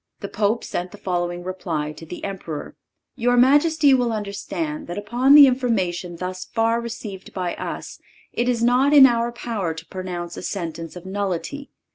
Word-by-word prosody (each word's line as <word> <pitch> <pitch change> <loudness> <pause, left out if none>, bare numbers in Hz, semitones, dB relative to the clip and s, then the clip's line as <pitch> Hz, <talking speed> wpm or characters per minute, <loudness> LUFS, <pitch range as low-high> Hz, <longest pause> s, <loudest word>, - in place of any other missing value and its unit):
The 200 - -4
Pope 210 +3 0
sent 175 +1 -4
the - - -12
following 175 -1 -2
reply 170 -5 -3
to 160 +1 -11
the 180 - -8
Emperor: 175 -6 -6 0.4
"Your 245 +1 +2
majesty 290 +3 +5
will 245 -2 +2
understand 220 +9 -4
that 175 +2 -5
upon 240 +7 +4
the 290 -1 +11
information 195 -9 0
thus 185 +1 -5
far 230 +2 0
received 225 -5 -7
by 180 -2 -2
us - - -6 0.3
it 245 +1 0
is 235 -2 0
not 255 +4 +4
in 280 -2 +10
our 235 -1 +2
power 215 -8 -3
to 160 - -9
pronounce 175 -2 -6
a - - -5
sentence 170 -3 -5
of 180 0 -10
nullity. 200 - -3
205 Hz, 170 wpm, -22 LUFS, 180-245 Hz, 0.4 s, the